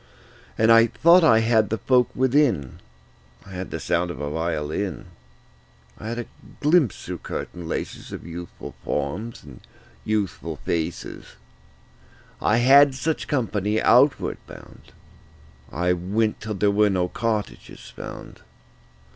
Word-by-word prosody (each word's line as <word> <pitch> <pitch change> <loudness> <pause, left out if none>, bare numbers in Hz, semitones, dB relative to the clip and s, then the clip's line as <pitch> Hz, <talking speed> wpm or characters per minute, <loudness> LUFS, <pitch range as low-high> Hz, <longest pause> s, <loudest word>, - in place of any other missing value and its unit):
And 110 +1 +4
I 115 0 +7
thought 170 +8 +5
I 115 -8 +5
had 110 -2 +2
the 110 - -1
folk 125 +3 +2
within: 130 - +1 0.7
I 100 - -13
had 95 0 -6
the - - -5
sound 85 +1 0
of 85 - -7
a 75 0 -4
violin; 80 +1 -3 0.9
I 110 - -7
had 115 - -4
a 120 - -4 0.3
glimpse 150 - +2
through - - -5
curtain 85 -1 -6
laces - - -5
Of - - -8
youthful 85 +1 -8
forms 105 +12 -4
and 70 -4 -13 0.4
youthful 105 -3 -2
faces. 85 0 -4 1.1
I 105 - +2
had 135 +3 +6
such 160 +4 -2
company 110 -6 0
outward 130 +6 +3
bound. - - -14 0.8
I 90 +4 +1
went 105 +5 -1
till 105 0 -4
there 100 +1 +2
were 105 +1 +3
no 90 -2 0
cottages 110 +2 -4
found. - - -9
105 Hz, 130 wpm, -23 LUFS, 90-120 Hz, 1.1 s, I